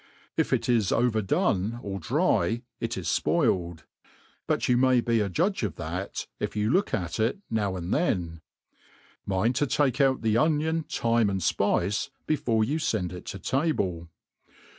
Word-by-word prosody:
if -, -, 0 dB
it -, -, +1 dB
is 115 Hz, -6 st, +2 dB
overdone 115 Hz, -, +1 dB
or 100 Hz, -1 st, -4 dB
<try, 115 Hz, +7 st, +1 dB, 0.2 s
it 115 Hz, -1 st, -3 dB
is 90 Hz, -, -5 dB
fpoiled; 85 Hz, -, +1 dB, 0.6 s
but -, -, 0 dB
you 125 Hz, -, +4 dB
may 130 Hz, 0 st, +4 dB
be 115 Hz, -1 st, +1 dB
a 105 Hz, -2 st, 0 dB
judge 185 Hz, -, 0 dB
of 100 Hz, -8 st, -2 dB
that, 90 Hz, +5 st, -4 dB
if -, -, -3 dB
you 105 Hz, +2 st, +1 dB
look 190 Hz, +6 st, +2 dB
at 90 Hz, 0 st, -2 dB
it 115 Hz, -, +1 dB
now 100 Hz, -4 st, 0 dB
and 90 Hz, +1 st, -3 dB
then. 85 Hz, -, -1 dB, 0.9 s
Mind 100 Hz, +5 st, +1 dB
to 145 Hz, -, +2 dB
take 135 Hz, +1 st, +1 dB
out 135 Hz, -3 st, +2 dB
the 110 Hz, -1 st, +2 dB
onion, 160 Hz, +1 st, +1 dB
thyme, 115 Hz, -2 st, +2 dB
and 95 Hz, -1 st, -2 dB
fpice, 95 Hz, +4 st, +1 dB, 0.2 s
before 120 Hz, -8 st, +1 dB
you 145 Hz, +9 st, -1 dB
fend 95 Hz, -, -1 dB
it 90 Hz, -, -9 dB
to -, -, -5 dB
table. 95 Hz, -, -1 dB
110 Hz, 160 wpm, -27 LUFS, 95-130 Hz, 0.9 s, you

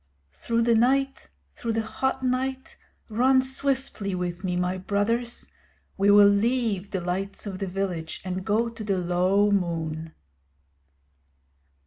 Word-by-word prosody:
Through 230 Hz, -, -1 dB
the 235 Hz, 0 st, +3 dB
night, 270 Hz, -, +1 dB, 0.2 s
through 230 Hz, -, -3 dB
the 225 Hz, 0 st, 0 dB
hot 265 Hz, +4 st, -2 dB
night, 260 Hz, +1 st, -2 dB, 0.3 s
run 255 Hz, +4 st, +3 dB
swiftly 265 Hz, -7 st, -1 dB
with 180 Hz, 0 st, -4 dB
me, 180 Hz, -2 st, -1 dB
my 180 Hz, +1 st, -1 dB
brothers. 230 Hz, +5 st, -1 dB, 0.5 s
We 200 Hz, +1 st, +2 dB
will 205 Hz, 0 st, +8 dB
leave 205 Hz, -1 st, +1 dB
the 190 Hz, -, -3 dB
lights 190 Hz, +4 st, -3 dB
of 195 Hz, -2 st, -5 dB
the 195 Hz, -, -2 dB
village 180 Hz, -4 st, -3 dB
and 185 Hz, 0 st, -3 dB
go 220 Hz, +3 st, +1 dB
to 230 Hz, -1 st, -7 dB
the 200 Hz, -2 st, 0 dB
low 185 Hz, +3 st, +2 dB
moon. 165 Hz, -4 st, -2 dB
200 Hz, 135 wpm, -26 LUFS, 185-235 Hz, 0.5 s, will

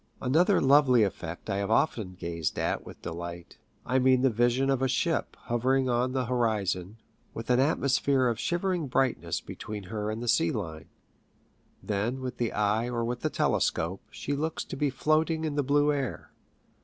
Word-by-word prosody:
Another 170 Hz, +10 st, +3 dB
lovely 135 Hz, -4 st, +5 dB
effect 90 Hz, -4 st, -4 dB
I 100 Hz, -2 st, -1 dB
have 100 Hz, 0 st, -2 dB
often 110 Hz, -6 st, +1 dB
gazed 85 Hz, -3 st, -3 dB
at -, -, -1 dB
with -, -, -12 dB
delight. 85 Hz, +1 st, -7 dB, 0.3 s
I 130 Hz, +1 st, +2 dB
mean 130 Hz, 0 st, +4 dB
the 135 Hz, -, +4 dB
vision 120 Hz, +4 st, +2 dB
of 135 Hz, -1 st, 0 dB
a 135 Hz, -, +3 dB
ship 165 Hz, +6 st, 0 dB
hovering 130 Hz, +2 st, +1 dB
on 125 Hz, +1 st, +1 dB
the 130 Hz, -1 st, 0 dB
horizon, 110 Hz, -5 st, -1 dB, 0.4 s
with 115 Hz, +2 st, -3 dB
an 125 Hz, -, +4 dB
atmosphere 135 Hz, -2 st, +2 dB
of 115 Hz, -3 st, 0 dB
shivering 175 Hz, -2 st, -1 dB
brightness 130 Hz, -1 st, 0 dB
between 105 Hz, -1 st, -7 dB
her 105 Hz, -1 st, -2 dB
and 110 Hz, +1 st, -3 dB
the -, -, -5 dB
sea 165 Hz, +7 st, +3 dB
line. 85 Hz, -, -5 dB, 0.9 s
Then, 110 Hz, +5 st, -1 dB
with 130 Hz, -1 st, -5 dB
the 120 Hz, -2 st, -1 dB
eye 105 Hz, +3 st, +1 dB
or 120 Hz, -1 st, -1 dB
with 120 Hz, +1 st, -3 dB
the -, -, -1 dB
telescope, 90 Hz, +4 st, 0 dB
she 145 Hz, -, -4 dB
looks 155 Hz, +3 st, -2 dB
to -, -, -7 dB
be 145 Hz, +1 st, +1 dB
floating 160 Hz, +3 st, +1 dB
in 155 Hz, -, -2 dB
the 145 Hz, -, +1 dB
blue 145 Hz, +2 st, +3 dB
air. 135 Hz, -4 st, -4 dB
125 Hz, 180 wpm, -28 LUFS, 105-140 Hz, 0.9 s, lovely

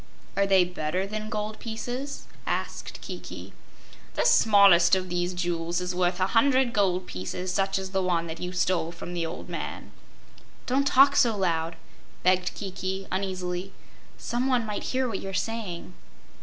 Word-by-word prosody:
"Are 200 Hz, 0 st, +2 dB
they 190 Hz, -2 st, +6 dB
better 180 Hz, +1 st, -2 dB
than 215 Hz, +1 st, -5 dB
gold 215 Hz, 0 st, -3 dB
pieces?" 245 Hz, +5 st, -5 dB, 0.2 s
asked -, -, -3 dB
Kiki. -, -, -8 dB, 0.6 s
"The -, -, +1 dB
smallest 200 Hz, -, +6 dB
of 185 Hz, -1 st, -2 dB
these 175 Hz, +1 st, -1 dB
jewels 175 Hz, -1 st, -1 dB
is 180 Hz, 0 st, -2 dB
worth 180 Hz, 0 st, +1 dB
a 185 Hz, -, +3 dB
hundred 255 Hz, +1 st, +4 dB
gold 185 Hz, -3 st, +2 dB
pieces 180 Hz, -, -4 dB
such 195 Hz, +1 st, +1 dB
as 190 Hz, -1 st, -4 dB, 0.5 s
you 180 Hz, -, -4 dB
stole 180 Hz, -2 st, 0 dB
from 175 Hz, 0 st, -8 dB
the 170 Hz, -2 st, -1 dB
old 165 Hz, -, -7 dB
man." -, -, -6 dB, 0.7 s
"Don't 275 Hz, +2 st, +2 dB
talk 275 Hz, +2 st, +6 dB
so 230 Hz, -3 st, +4 dB
loud," 165 Hz, -3 st, 0 dB, 0.5 s
begged 185 Hz, 0 st, +2 dB
Kiki, 190 Hz, -1 st, -4 dB
uneasily. 185 Hz, -1 st, -3 dB, 0.4 s
"Some 245 Hz, +2 st, -1 dB
one 250 Hz, -2 st, +3 dB
else 225 Hz, -, -6 dB
might 210 Hz, -, -3 dB
hear 260 Hz, 0 st, 0 dB
what 215 Hz, -5 st, -3 dB
you 195 Hz, -, -6 dB
are 195 Hz, -, -5 dB
saying." 200 Hz, -6 st, -3 dB
190 Hz, 155 wpm, -27 LUFS, 180-215 Hz, 0.7 s, they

